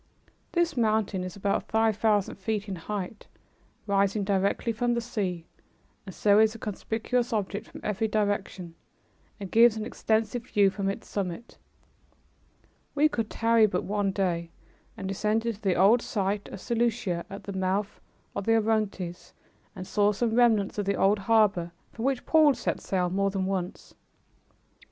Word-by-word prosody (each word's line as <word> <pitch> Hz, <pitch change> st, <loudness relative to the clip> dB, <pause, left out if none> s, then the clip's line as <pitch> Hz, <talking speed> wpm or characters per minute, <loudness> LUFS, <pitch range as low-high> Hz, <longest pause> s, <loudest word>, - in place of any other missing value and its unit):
This 340 Hz, -3 st, +1 dB
mountain 215 Hz, -5 st, +1 dB
is 185 Hz, -1 st, -6 dB
about 200 Hz, 0 st, -1 dB
five 220 Hz, -1 st, +2 dB
thousand 210 Hz, -2 st, +1 dB
feet 205 Hz, +1 st, -3 dB
in 195 Hz, -, -4 dB
height, 200 Hz, +3 st, -6 dB, 0.6 s
rising 200 Hz, 0 st, +1 dB
directly 200 Hz, +3 st, 0 dB
from 240 Hz, +2 st, 0 dB
the -, -, +1 dB
sea, 195 Hz, -8 st, -3 dB, 0.6 s
and 190 Hz, -, -8 dB
so 205 Hz, 0 st, +4 dB
is 220 Hz, 0 st, +4 dB
a -, -, -6 dB
conspicuous 225 Hz, +3 st, -2 dB
object 205 Hz, -1 st, -2 dB
from -, -, -11 dB
every 210 Hz, +1 st, -1 dB
direction 205 Hz, -4 st, -2 dB, 0.7 s
and 195 Hz, -2 st, -7 dB
gives 230 Hz, -1 st, +6 dB
an 215 Hz, -, -3 dB
extensive 225 Hz, +2 st, -1 dB
view 200 Hz, -2 st, +3 dB
from 195 Hz, 0 st, -2 dB
its 195 Hz, -, -5 dB
summit. 195 Hz, +3 st, -5 dB, 1.4 s
We 300 Hz, +2 st, +4 dB
could 230 Hz, -6 st, -2 dB
tarry 230 Hz, -1 st, +3 dB
but 180 Hz, -3 st, -2 dB
one 205 Hz, -1 st, 0 dB
day, 175 Hz, -4 st, -1 dB, 0.5 s
and 190 Hz, -, -5 dB
descended 215 Hz, +3 st, -1 dB
to -, -, -26 dB
the 190 Hz, -4 st, +1 dB
old 210 Hz, +6 st, +5 dB
site 205 Hz, -2 st, -2 dB
of -, -, -8 dB
Seleucia, 225 Hz, -6 st, -1 dB
at 195 Hz, +1 st, -8 dB
the 200 Hz, -, -6 dB
mouth 190 Hz, +2 st, -2 dB, 0.3 s
of 195 Hz, -, -3 dB
the 225 Hz, -, +5 dB
Orontes, 210 Hz, -5 st, -2 dB, 0.4 s
and 185 Hz, -, -7 dB
saw 205 Hz, +2 st, +2 dB
some 225 Hz, +2 st, -1 dB
remnants 225 Hz, -4 st, +3 dB
of 205 Hz, -, -1 dB
the 200 Hz, 0 st, +1 dB
old 200 Hz, +2 st, +3 dB
harbor 200 Hz, -5 st, +2 dB, 0.2 s
from 230 Hz, -, -5 dB
which 265 Hz, -2 st, 0 dB
Paul 310 Hz, -4 st, +5 dB
set -, -, -3 dB
sail 180 Hz, -2 st, -1 dB
more 195 Hz, +1 st, +1 dB
than 195 Hz, -1 st, -2 dB
once. 190 Hz, -1 st, -4 dB
205 Hz, 160 wpm, -27 LUFS, 195-225 Hz, 1.4 s, gives